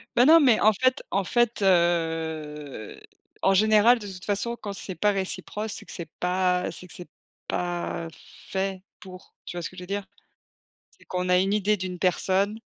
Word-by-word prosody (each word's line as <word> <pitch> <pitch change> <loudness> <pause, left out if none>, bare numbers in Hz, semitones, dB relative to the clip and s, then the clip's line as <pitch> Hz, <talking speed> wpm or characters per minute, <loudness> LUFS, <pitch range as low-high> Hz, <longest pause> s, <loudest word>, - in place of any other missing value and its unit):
Bah 245 - +6
non, 325 +3 +8
mais 255 -7 +5
en 215 +1 +5
fait 255 +6 +1
en 195 - +1
fait, 240 +3 +1
heu, 160 - 0 0.4
en 195 - +4
général, 215 +4 +5
de 205 - -8
toute 180 -1 -10
façon, 205 +4 -1
quand 205 -2 -5
c'est 190 -1 -6
pas 210 +2 +2
réciproque, 205 +2 -3
c'est - - -5
que - - -11
c'est 170 -3 -6
pas 180 0 +1
c'est 180 - -9
que - - -9
c'est 180 - -9 0.4
pas 175 -1 -3 0.4
fait 190 -1 -2 0.2
pour, 185 -1 -13
tu 175 - -7
vois - - -3
ce 165 - -4
que 185 - -17
je 180 - -7
veux - - -10
dire? 200 +1 -3 0.9
C'est - - -23
qu'on 180 0 -3
a 180 - +5
une 195 +2 +1
idée 210 0 +2
d'une 185 -1 -5
personne 190 +3 +1
190 Hz, 195 wpm, -26 LUFS, 180-210 Hz, 0.9 s, non